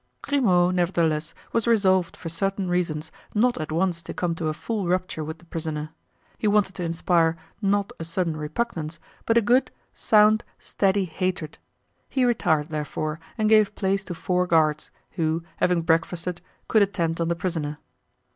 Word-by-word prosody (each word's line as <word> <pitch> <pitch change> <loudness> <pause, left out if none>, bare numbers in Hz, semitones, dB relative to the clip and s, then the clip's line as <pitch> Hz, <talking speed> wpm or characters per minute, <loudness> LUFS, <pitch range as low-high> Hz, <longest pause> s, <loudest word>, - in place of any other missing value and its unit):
Grimaud, 185 -11 +3
nevertheless, 165 -4 0 0.2
was 230 0 +1
resolved 190 -6 +3
for - - -7
certain 195 +3 0
reasons 165 -3 -1 0.2
not 240 -3 +2
at 155 - -5
once 170 +1 0
to - - -8
come 175 -2 0
to 165 -1 -3
a 155 - 0
full 210 -2 -3
rupture 180 -3 -1
with 160 +1 -6
the 175 - -20
prisoner; 155 -2 -4 0.5
he 215 - 0
wanted 205 -2 +3
to 180 - -5
inspire, 165 0 +2 0.2
not 200 0 +1
a - - -4
sudden 170 0 -1
repugnance, 160 0 -3 0.3
but 230 - +4
a 235 - +4
good, 245 +5 +3 0.2
sound, 215 +1 +4
steady 195 -1 +1
hatred; 175 -2 -3 0.5
he 260 -2 +2
retired, 160 -10 +1
therefore, 155 0 -3 0.2
and 215 -1 +2
gave 215 -1 +4
place 195 0 0
to 175 - -5
four 180 +1 0
guards, 155 -2 +2 0.2
who, 165 -1 -1
having 175 -2 +2
breakfasted, 170 +2 0 0.3
could 220 - +4
attend 170 -5 0
on 165 - +1
the 170 - +1
prisoner. 160 -4 -3
175 Hz, 165 wpm, -25 LUFS, 160-200 Hz, 0.5 s, but